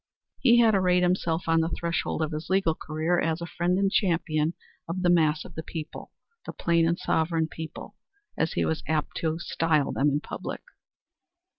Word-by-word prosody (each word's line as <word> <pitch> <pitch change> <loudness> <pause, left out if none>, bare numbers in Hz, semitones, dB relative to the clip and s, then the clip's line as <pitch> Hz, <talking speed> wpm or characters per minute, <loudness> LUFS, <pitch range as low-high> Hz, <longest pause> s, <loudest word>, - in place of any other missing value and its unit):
He 240 -3 +5
had 225 -2 +5
arrayed 180 -2 +3
himself 175 -2 +1
on 165 0 +3
the 160 - 0
threshold 170 -1 -2
of 155 - -2
his 155 +1 -5
legal 190 -3 +2
career 160 +3 -1
as 165 0 0
a 170 - -4
friend 175 +2 0
and 195 0 +2
champion 165 -4 +1 0.3
of 180 +2 -3
the 175 - +4
mass 155 -3 +2
of - - -11
the 160 - -5
people 160 -1 -7 0.4
the - - -5
plain 170 -1 +2
and 170 +1 +1
sovereign 160 0 0
people, 160 0 -8 0.4
as 160 - 0
he - - +1
was 160 - -1
apt 155 -1 -1
to 160 -1 -1
style 160 -4 0
them 145 +2 +2
in 145 +1 0
public. - - -6
165 Hz, 185 wpm, -27 LUFS, 160-175 Hz, 0.4 s, He